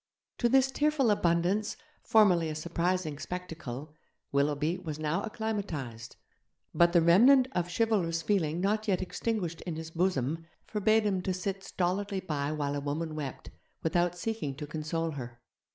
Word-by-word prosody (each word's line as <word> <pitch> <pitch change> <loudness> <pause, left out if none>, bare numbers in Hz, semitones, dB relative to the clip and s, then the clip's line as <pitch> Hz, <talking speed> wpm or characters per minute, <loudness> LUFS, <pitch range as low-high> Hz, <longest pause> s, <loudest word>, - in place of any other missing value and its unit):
To 240 - +3
this 265 +1 +4
tearful 290 -4 +2
abundance, 180 +3 +1 0.2
formerly 180 -7 +4
a 155 - -4
surprising 170 -1 -1
spectacle, 155 -6 -6 0.4
Willoughby 150 +5 +1
was 160 -5 -5
now 155 +1 -1
acclimatized; 175 - -4 0.6
but 170 0 +5
the 170 -2 +4
remnant 250 +10 +6
of 175 -5 -1
chivalrous 175 -6 +1
feeling 170 -6 +1
not 210 +3 0
yet 190 -2 +1
extinguished 185 -3 -3
in 170 -3 -4
his 160 0 -6
bosom 165 -2 0 0.2
forbade 215 +1 +2
him 195 -3 +1
to 185 0 -1
sit 195 +1 -3
stolidly 195 +2 -1
by 150 -5 -2
while 145 -2 -1
a - - -1
woman 155 +3 -3
wept, 145 -4 -6 0.3
without 175 +2 +1
seeking 175 -9 -3
to 150 +2 -6
console 160 +2 -2
her. 120 -4 -7
170 Hz, 150 wpm, -30 LUFS, 155-200 Hz, 0.6 s, remnant